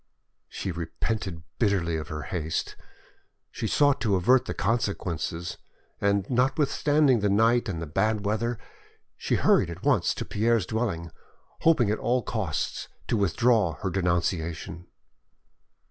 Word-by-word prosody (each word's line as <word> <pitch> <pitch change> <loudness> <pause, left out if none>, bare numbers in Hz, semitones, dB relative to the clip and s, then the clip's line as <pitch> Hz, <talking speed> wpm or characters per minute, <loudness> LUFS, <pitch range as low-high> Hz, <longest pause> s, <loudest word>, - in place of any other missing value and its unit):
She 95 - -4
repented 85 +1 -4 0.2
bitterly 95 -6 +1
of 80 -1 -4
her 75 -2 -5
haste, 80 -4 -3 0.8
she 115 - -3
sought 145 +4 +3
to 105 -4 +2
avert 125 +8 +4
the - - -3
consequences, 90 -6 -2 0.4
and 100 -1 +1
notwithstanding 140 +1 +2
the 105 0 +1
night 115 +3 +3
and 85 -4 -3
the 80 - -4
bad 105 +7 0
weather, 115 +3 0 0.6
she - - -1
hurried 90 - +3
at 85 +2 -8
once - - +2
to - - -4
Pierre's 110 -1 +1
dwelling, 100 -8 -2 0.5
hoping 135 -10 +3
at 110 - -1
all 125 +2 +1
costs 100 -10 -3 0.2
to - - +2
withdraw 105 -2 +2
her 95 - -1
denunciation. 85 -2 -2
100 Hz, 130 wpm, -27 LUFS, 85-120 Hz, 0.8 s, avert